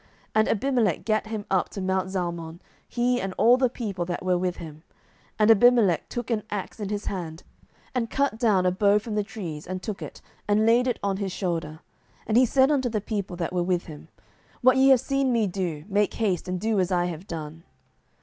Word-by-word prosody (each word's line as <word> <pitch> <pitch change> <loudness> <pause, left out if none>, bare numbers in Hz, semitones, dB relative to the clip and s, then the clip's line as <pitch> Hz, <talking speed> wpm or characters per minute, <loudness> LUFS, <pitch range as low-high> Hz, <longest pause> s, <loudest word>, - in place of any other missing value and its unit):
07:009:048 - - -31 0.2
And 220 0 +3
Abimelech 230 - +1
gat 215 -1 0
him 215 -2 -5
up 190 -2 +1
to - - -7
mount 190 0 -1
Zalmon, 170 -3 -4 0.3
he 245 0 0
and 190 -1 -4
all 240 +2 +6
the 255 -1 +2
people 205 -7 -4
that 175 +1 -4
were 185 -1 +2
with 180 0 -1
him; 155 -2 -9 0.6
and 215 +1 +5
Abimelech 225 -6 +4
took 240 0 -4
an 220 -2 +1
axe 205 +2 -5
in 205 -2 -4
his 205 0 -3
hand, 170 -3 -5 0.5
and 240 -3 -1
cut 275 -5 0
down 205 -6 +3
a 180 - +3
bough 200 +2 +3
from 215 +1 -4
the 210 0 0
trees, 180 -8 -7
and 185 0 -5
took 215 -3 -5
it, - - -8 0.3
and 210 +1 +3
laid 240 +3 +4
it 245 - 0
on 195 -1 0
his 195 -1 -3
shoulder, 165 -4 -3 0.4
and 235 +2 +3
said 270 +1 +4
unto 260 -4 +1
the 220 -2 -1
people 200 -3 -4
that 175 0 -3
were 180 - +1
with 180 0 0
him, 155 -4 -11 0.5
What 255 0 +5
ye 265 +1 +5
have 260 -3 +6
seen 275 -1 0
me 230 -3 +2
do, 175 -5 -3
make 205 0 +1
haste, 195 -6 -1
and 180 0 -2
do 220 +1 0
as 185 0 0
I 175 -1 +2
have 175 +2 -6
done. 160 -2 -7
200 Hz, 215 wpm, -25 LUFS, 180-230 Hz, 0.6 s, all